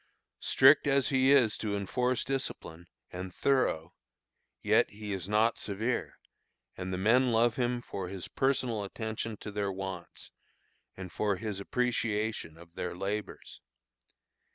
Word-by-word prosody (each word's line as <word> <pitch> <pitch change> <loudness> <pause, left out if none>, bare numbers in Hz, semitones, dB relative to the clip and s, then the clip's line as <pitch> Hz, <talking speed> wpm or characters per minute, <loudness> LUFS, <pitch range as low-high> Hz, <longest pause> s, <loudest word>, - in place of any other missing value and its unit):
Strict 140 +3 +5
as 135 -2 +3
he 130 0 +4
is 125 -7 +4
to 105 -2 -1
enforce 125 +6 0
discipline, 85 -10 -4 0.2
and 90 +1 -6
thorough, 90 - +1 0.7
yet - - +4
he 105 0 -6
is 95 -1 -4
not 110 +2 +2
severe; 110 +5 -2 0.6
and 95 0 -5
the 90 - -2
men 120 +6 +4
love 115 0 +3
him 120 -1 -1
for 95 -6 -5
his 95 -1 -6
personal 130 -5 0
attention 110 +1 -4
to 105 - -8
their 100 -1 -1
wants, 95 -2 -7 0.7
and 95 -2 -7
for 105 -2 0
his 105 -1 -4
appreciation 110 -6 -1
of 85 0 -15
their 90 0 -4
labors. 100 +3 -5
105 Hz, 135 wpm, -30 LUFS, 95-125 Hz, 0.7 s, Strict